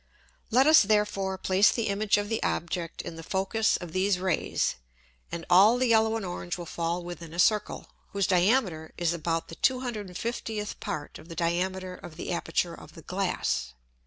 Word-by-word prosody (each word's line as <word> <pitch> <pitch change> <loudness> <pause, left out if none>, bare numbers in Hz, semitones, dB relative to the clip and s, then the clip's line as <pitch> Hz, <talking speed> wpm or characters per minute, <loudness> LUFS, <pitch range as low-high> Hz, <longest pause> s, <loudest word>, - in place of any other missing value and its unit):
Let 255 +4 +4
us 315 +1 +8
therefore 205 -2 +1
place 190 +2 +4
the 230 - -1
Image 205 +1 +2
of 205 0 -1
the 225 +1 -2
Object 170 0 -2
in 165 - -7
the - - -7
Focus 195 +6 +1
of 175 -2 -8
these 185 +2 +1
Rays, 185 - 0 0.5
and 170 -1 -5
all 200 +7 +6
the 255 - +2
yellow 220 0 +4
and 220 -3 -3
orange 175 0 -4
will 175 - -6
fall 170 +2 -2
within 170 -2 -8
a - - -5
Circle, 210 +3 +2 0.2
whose 200 -1 0
Diameter 180 -4 +2
is 170 -1 +1
about 165 0 -2
the 165 - -8
250th 225 -3 -2
Part 145 -1 -5
of 165 - -15
the 165 - -7
Diameter 180 +2 -1
of 175 -3 -11
the - - -4
Aperture 170 0 -1
of - - -12
the 165 - -12
Glass. 180 - -1
185 Hz, 180 wpm, -28 LUFS, 170-210 Hz, 0.5 s, us